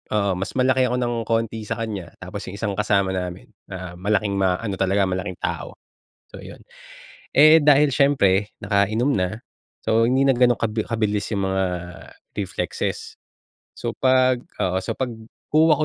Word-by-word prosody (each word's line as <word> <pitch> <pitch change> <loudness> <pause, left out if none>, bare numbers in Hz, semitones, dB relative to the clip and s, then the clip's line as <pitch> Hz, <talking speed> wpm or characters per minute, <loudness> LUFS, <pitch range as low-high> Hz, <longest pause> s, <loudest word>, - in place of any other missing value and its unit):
oo, 100 -2 +2
mas 95 - -5
malaki 130 0 +3
ako 125 - -1
ng 120 -1 -1
konti 115 -1 -1
sa - - -2
kanya 100 -6 -5
tapos - - -7
yung 95 - -7
isang 105 -1 -2
kasama 100 -2 +2
namin 90 -1 -5 0.2
na 90 -2 -7
malaking 105 +1 0
ma-ano 95 +2 0
talaga 95 +1 +2
malaking 95 0 -3
tao, - - -4 0.5
so - - -11
yun. - - -11 0.7
Eh, 155 +3 +8
dahil 145 0 +5
siyempre 105 -8 +2
nakainom 110 +7 +1
na, 95 +5 -2 0.4
so 115 +1 +3
hindi 130 +2 +2
nag 135 -3 +3
ganong 125 -2 +4
kab 115 -2 0 0.2
kabilis 105 -3 -1
yung 100 -1 -1
mga 95 0 +1 0.7
reflexes, 95 -2 -3 0.6
so, - - -3
pag 130 -1 +3 0.2
oo, 95 0 +1
so - - -4
pagkuha 130 +6 0
105 Hz, 150 wpm, -22 LUFS, 95-125 Hz, 0.7 s, Eh